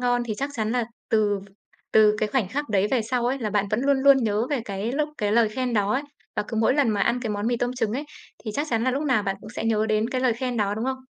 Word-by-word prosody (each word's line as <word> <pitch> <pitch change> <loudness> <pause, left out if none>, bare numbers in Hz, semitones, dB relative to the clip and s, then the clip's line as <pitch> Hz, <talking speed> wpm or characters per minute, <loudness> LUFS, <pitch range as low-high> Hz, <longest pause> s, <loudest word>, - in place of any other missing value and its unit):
ngon" 245 -1 +1
thì 215 - -2
chắc 275 +1 -2
chắn 220 -2 -1
là 245 -2 +1 0.2
từ 205 -2 +2 0.5
từ 215 -1 +5
cái 215 - 0
khoảnh 220 -6 0
khắc 290 +3 -3
đấy 200 -1 +2
về 255 -4 +2
sau 240 +2 -1
ấy, 260 +3 0
là 220 -5 -2
bạn 205 -1 +1
vẫn 215 - +1
luôn 275 0 +2
luôn 275 0 +7
nhớ 225 -2 0
về 280 -5 0
cái 200 +3 -3
lúc 300 +2 0
cái 210 0 0
lời 230 -1 +4
khen 250 +1 -2
đó 205 0 +2
ấy. 265 - 0 0.3
Và - - +1
cứ 225 - -4
mỗi 225 +4 +3
lần 285 -4 +3
mà 210 -2 0
ăn 240 +5 +1
cái 225 - -2
món 205 +1 -2
mì 240 0 +1
tôm 245 +1 -1
trứng 225 -4 -1
ấy, 275 +5 -3 0.4
thì 215 - -3
chắc 290 +2 -1
chắn 230 0 +1
là 255 - +2
lúc 275 +3 -1
nào 255 -8 +2
bạn 195 -1 -2
cũng 210 - -10
sẽ 235 - -5
nhớ 220 -1 +1
đến 215 +1 +1
cái 255 - -1
lời 255 -2 +3
khen 245 +1 -3
đó, 205 -1 0
đúng 220 +3 -3
không? 260 0 -2
230 Hz, 310 wpm, -25 LUFS, 215-255 Hz, 0.5 s, luôn